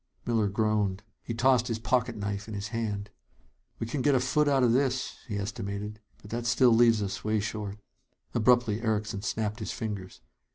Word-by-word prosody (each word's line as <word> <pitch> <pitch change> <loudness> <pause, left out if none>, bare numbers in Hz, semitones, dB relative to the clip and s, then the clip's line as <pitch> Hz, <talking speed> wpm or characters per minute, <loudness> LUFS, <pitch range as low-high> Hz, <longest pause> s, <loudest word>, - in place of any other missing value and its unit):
Miller 115 -3 +2
groaned. 105 -1 0 0.2
He 115 - -5
tossed 125 0 +3
his 115 -3 -1
pocket 115 +1 0
knife 100 0 -4
in 110 - -6
his 100 0 -4
hand. 105 -3 -3 0.7
"We - - -3
can 130 +4 -2
get 145 +1 +4
a - - +4
foot 145 +4 +2
out 135 -2 +3
of 120 - +5
this," 130 0 0
he 105 -4 -3
estimated. 100 +1 -4 0.2
"But 105 - -12
that 120 +1 -2
still 125 +1 +5
leaves 115 -2 +5
us 95 - -4
way 110 0 +1
short." 105 -1 -4 0.6
Abruptly, 115 -1 +3
Erickson 105 -3 -1
snapped 110 0 -2
his 110 - -4
fingers. 100 -5 -5
110 Hz, 180 wpm, -29 LUFS, 105-120 Hz, 0.7 s, of